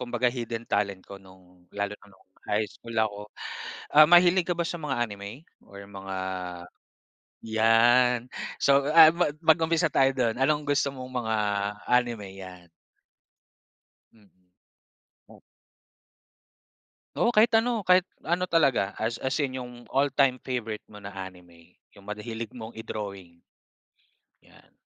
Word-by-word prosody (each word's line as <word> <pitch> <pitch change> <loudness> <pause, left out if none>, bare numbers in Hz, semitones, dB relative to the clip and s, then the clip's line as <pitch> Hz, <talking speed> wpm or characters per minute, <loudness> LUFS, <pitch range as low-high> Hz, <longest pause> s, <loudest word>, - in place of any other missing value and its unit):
kumbaga 120 0 0
hidden 115 -2 -5
talent 100 -3 -2
ko 100 -1 -11
no'ng 90 -2 -20
lalo 100 0 -2
na 100 - -19
no'ng 95 -1 -23 0.2
high 105 +1 +1
school 115 +2 -11
ako. 105 -2 0 0.7
Ah, 150 +1 +8
mahilig 175 +1 +5
ka 175 - 0
ba 170 - -1
sa 170 - -3
mga 150 -3 -3
anime 100 +6 -9 0.2
or 100 0 -11
mga 95 -1 -7 1.3
'yan. 115 +3 +4 0.4
So, 140 0 +4
ah, 160 0 +9 0.3
mag-umpisa 160 0 +3
tayo 135 0 +3
do'n. 120 -4 0
Anong 150 +3 +2
gusto 140 -1 +1
mong 130 -2 -5
mga 110 0 0 0.5
anime? 120 -5 +1
'Yan. 90 -2 -11 1.5
Mm. 95 -4 -27 2.7
Oo. 235 - +2
Kahit 225 +2 +4
ano. 230 0 +1
Kahit 180 0 +6 0.2
ano 175 +2 0
talaga 140 - +2
as 115 +1 -1
as 130 - 0
in, 130 -2 -2
'yong 125 -1 -7 0.2
all-time 135 -1 +2
favorite 115 -4 -4
mo 105 - -11
na 100 0 -9
anime. 90 -3 -12 0.2
'Yong 100 - -16
mad 105 +1 -6
hilig 115 0 -6
mong 115 -1 -9
i-drawing. 100 -6 -7 1.1
Yan. - - -22
115 Hz, 130 wpm, -26 LUFS, 100-140 Hz, 2.7 s, ah